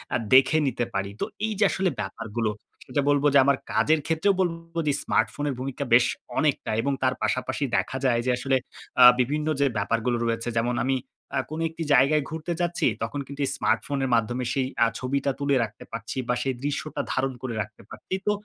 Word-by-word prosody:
আ - - +4 0.2
দেখে 135 +4 +6
নিতে 120 -2 -1
পারি। 100 0 -1
তো - - 0 0.2
এই 220 - -1
যে - - +4
আসলে 190 -1 +1
ব্যাপারগুলো। 110 +2 -3 0.4
সেটা 135 +2 0
বলব 145 0 +3
যে 140 - +7
আমার 140 0 +3
কাজের 160 0 +3
ক্ষেত্রেও 165 +5 +2
বলব 165 -2 -3
যে 145 - +3
স্মার্টফোনের 135 +5 0
ভূমিকা 135 +2 -3
বেশ 120 0 +7 0.3
অনেকটা 150 -7 +1
এবং 140 +4 0
তার 130 - +3
পাশাপাশি 130 +2 -1
দেখা 130 - -1
যায় 120 -2 +3
যে 130 - +2
আসলে 135 +2 +1 0.5
আ - - +10 0.2
বিভিন্ন 150 +5 0
যে 140 - +4
ব্যাপারগুলো 115 +4 0
রয়েছে 115 +1 -1
যেমন 120 +1 0
আমি 135 - +2 0.4
আ - - +1
কোন 155 +1 -5
একটি 165 +1 -6
জায়গায় 145 +3 +4
ঘুরতে 160 +2 -4
যাচ্ছি 175 0 0 0.2
তখন 145 - -3
কিন্তু 140 +1 -9
এই - - -1
স্মার্টফোনের 135 -2 0
মাধ্যমে 120 +2 0
সেই 130 -2 0 0.2
আ - - +3
ছবিটা 140 +2 0
তুলে 140 -1 +1
রাখতে 105 -2 -7
পারছি 115 +3 -6
বা - - +2
সেই 135 -1 -1
দৃশ্যটা 145 0 -2
ধারণ 130 0 0
করে 130 -2 -4
রাখতে 105 +1 -9
পারছি। - - -8
তো - - +5
135 Hz, 195 wpm, -25 LUFS, 120-150 Hz, 0.5 s, আ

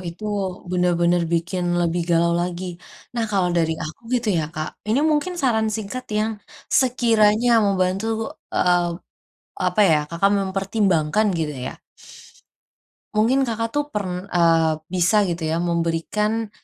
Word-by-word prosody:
itu 175 +6 -9 0.5
bener-bener 175 -1 +2
bikin 175 +2 -1 0.2
lebih 170 0 0
galau 170 0 +3
lagi. 180 +1 -4 0.5
Nah, 230 -1 0
kalau 185 -3 +2
dari 160 -1 +2
aku 155 - -8
gitu 240 -3 0
ya, 160 - +1
Kak, 155 0 -3 0.2
ini 230 +6 +2
mungkin 305 +5 0
saran 220 -4 +2
singkat 225 +4 -5
yang 220 +1 +1 0.5
sekiranya 235 -3 +3 0.2
membantu, 190 +1 0 0.5
eee, 175 -1 +3 0.8
apa 215 - +2
ya, - - +5
Kakak 195 +4 +2
mempertimbangkan 195 -1 +1
gitu 150 -2 -2
ya. - - -6 1.4
Mungkin 250 +5 +3
Kakak 230 0 -2
tuh, 290 +2 0
pern 185 -2 -3
eee, 165 -3 +3 0.2
bisa 185 +4 +3
gitu 170 -4 -2
ya 165 +2 0
memberikan, 175 +6 -1
190 Hz, 130 wpm, -22 LUFS, 170-220 Hz, 1.4 s, ya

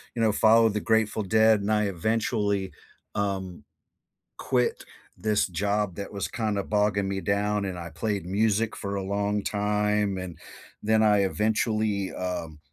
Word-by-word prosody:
you 115 - -1
know, 110 -1 +4
follow 115 +1 +5
the 105 0 -1
Grateful 110 -1 +1
Dead, 110 +1 +4
and 105 +2 -1
I 105 0 +3
eventually, 100 +1 -1 0.4
um, 95 -3 -3 0.8
quit - - 0 0.3
this 105 +2 +1
job 100 +1 -1
that 100 0 -6
was 100 -1 -3
kinda 105 -3 -1
bogging 105 -2 +1
me 95 0 -2
down, 100 +2 0
and 95 -2 -4
I 85 -1 -7
played 100 +2 -3
music 110 +3 +1
for 100 -1 -4
a 100 - -2
long 100 +1 -1
time, 105 -1 0
and 90 -3 -7 0.4
then 110 +1 +3
I 105 -2 +4
eventually, 105 -1 0
um, 85 -4 -4
105 Hz, 150 wpm, -26 LUFS, 95-110 Hz, 0.8 s, follow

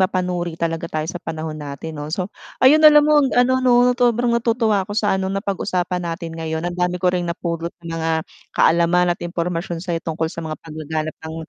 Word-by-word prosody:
mapanuri 180 -2 -1
talaga 165 0 -2
tayo 155 -1 -2
sa 175 +2 -5
panahon 160 0 -5
natin 145 +2 -6
'no 145 - -5
so, 185 +5 -3 0.3
ayun 295 +4 +7
alam 300 -1 +8
mo 300 0 +5 0.2
ano 260 +1 +4
'no, 250 -1 +4
sobrang 245 -1 +2
natutuwa 230 -3 +2
ako 205 - -5
sa 205 -3 +2
ano, 190 - -1
napag-usapan 190 -2 -2
natin 170 -1 -5
ngayon 160 0 -4
ang 175 - -2
dami 180 0 0
ko 180 0 +1
ring 175 -1 -1
napulot 170 -1 -3 0.2
na - - -8
mga 160 0 0 0.5
kaalaman 175 +1 +4
at 175 - -10
impormasyon 170 0 -3
sa 180 - -3
'yo 165 - -1
tungkol 160 0 -3
sa - - -6
mga 155 -1 -5
paglaganap 155 0 -4 0.2
ng, 160 - -6
175 Hz, 200 wpm, -21 LUFS, 165-205 Hz, 0.5 s, alam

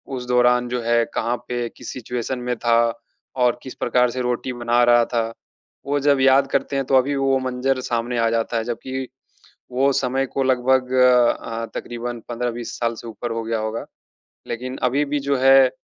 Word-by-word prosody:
उस 125 -1 -5
दौरान 125 0 +3
जो 125 0 -2
है 115 0 +3
कहाँ 120 +1 0
पे 120 -1 -2
किस - - -9
सिचुएशन 125 +1 -4
में 125 0 -2
था 115 -1 +3 0.7
और 120 0 +2
किस 130 - -8
प्रकार 125 0 +2
से 130 - -3
रोटी 125 +1 -2
बना 120 0 +2
रहा 120 0 +5
था। 115 -2 -1 0.6
वो 145 +1 0
जब 140 -1 +3
याद 135 +1 +5
करते - - -1
हैं 135 -1 0
तो 135 - +2
अभी 135 +2 +3
वो 135 -1 +2
मंजर 130 +1 -1
सामने 120 0 -2
आ 115 0 +3
जाता 115 0 -1
है। 115 - -1
जबकि 130 +3 -4 0.7
वो 135 +2 +2
समय 135 0 0
को 135 - -2
लगभग 130 0 +2
अ, 120 -2 +3
तकरीबन 120 0 -5
15-20 120 0 -4
साल 115 -1 0
से 115 - -9
ऊपर 115 +1 -6
हो 115 0 -3
गया 115 0 -1
होगा। 110 +1 -3 0.6
लेकिन 130 +2 -5
अभी 140 +4 +2
भी 145 +1 -1
जो 140 -1 +2
है, 135 0 +6
125 Hz, 190 wpm, -22 LUFS, 120-130 Hz, 0.7 s, है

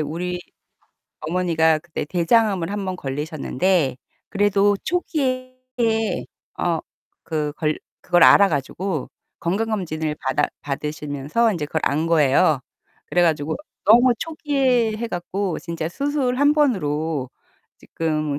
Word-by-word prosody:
우리 175 +4 -3 0.8
어머니가 160 -1 +2
그때 170 +1 -5
대장암을 180 +2 +2
1 205 -1 -3
번 185 -1 -3
걸리셨는데 150 +1 -1 0.3
그래도 205 0 +3
초기에 260 -7 -1 1.0
어 170 -2 0 0.4
그 150 -2 -2
걸 155 -1 -1 0.2
그걸 175 -2 +4
알아 200 - +7
가지고 155 +2 -3 0.3
건강검진을 170 -6 -2
받아 135 +2 +1
받으시면서 150 +8 -1
이제 165 -6 -3
그걸 160 +2 -2
안 155 +4 +1
거예요. 155 -1 +4 0.5
그래 175 - +2
가지고 155 -2 +1 0.3
너무 240 +4 +6
초기에 265 -8 +1
해 235 +1 -3
갖고 185 -1 -3
진짜 165 -2 -4
수술 275 - -1
1 285 +2 +4
번으로 160 - 0 0.5
지금 155 -3 -2
175 Hz, 250 characters per minute, -22 LUFS, 155-215 Hz, 1.0 s, 알아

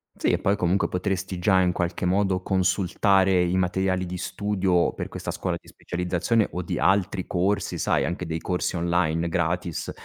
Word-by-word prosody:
Sì, - - -1
e - - +2
poi 100 +1 +1
comunque 90 +1 +1
potresti 95 0 -2
già 95 +1 +3
in 90 -1 +2
qualche 90 0 -2
modo 95 0 +1
consultare 95 0 +2
i 90 +1 0
materiali 95 0 0
di 90 0 -5
studio 95 -2 0
per - - -5
questa - - -5
scuola - - -2
di - - -27
specializzazione 90 +5 -1
o 90 - -3
di 90 - -3
altri 95 -1 +1
corsi, 95 +3 0
sai, - - +1
anche 90 +3 -3
dei 80 0 -3
corsi 90 +2 -2
online 85 -1 +1
gratis 85 0 -1
90 Hz, 175 wpm, -25 LUFS, 90-95 Hz, -, già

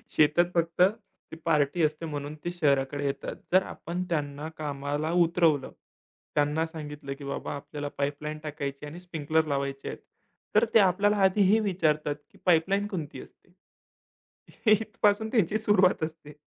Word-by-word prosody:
शेतात 155 +3 +5
फक्त 170 0 0 0.5
ती - - -6
पार्टी 150 +1 +2
असते 155 +2 0
म्हणून 145 -1 -5
ते 175 - -1
शहराकडे 145 -4 +1
येतात. 140 0 -3 0.2
जर 185 +1 +6
आपण 175 +1 -5
त्यांना 145 -1 -2
कामाला 145 +1 -2
उतरवलं, 165 -5 +2 0.6
त्यांना 150 +2 +2
सांगितलं 150 -3 -7
की 145 - -9
बाबा 140 - -4
आपल्याला 145 +1 -6
पाईपलाईन 145 +2 -2
टाकायची 145 -1 -5
आणि 160 +4 -8
स्प्रिंकलर 160 -3 0
लावायचे 140 -1 -2
आहेत. - - -5 0.6
तर 215 +2 +6
ते 225 - +8
आपल्याला 205 +2 +3
आधी 190 +2 +4
हे 220 - +5
विचारतात 155 -7 0 0.2
की - - -20
पाईपलाईन 190 +4 +3
कोणती 165 -8 -5
असते? 175 - -18 1.2
इथपासून 215 0 +2
त्यांची 215 -3 +2
सुरुवात 200 -5 +3
असते 155 -2 -6
155 Hz, 140 wpm, -28 LUFS, 145-180 Hz, 1.2 s, ते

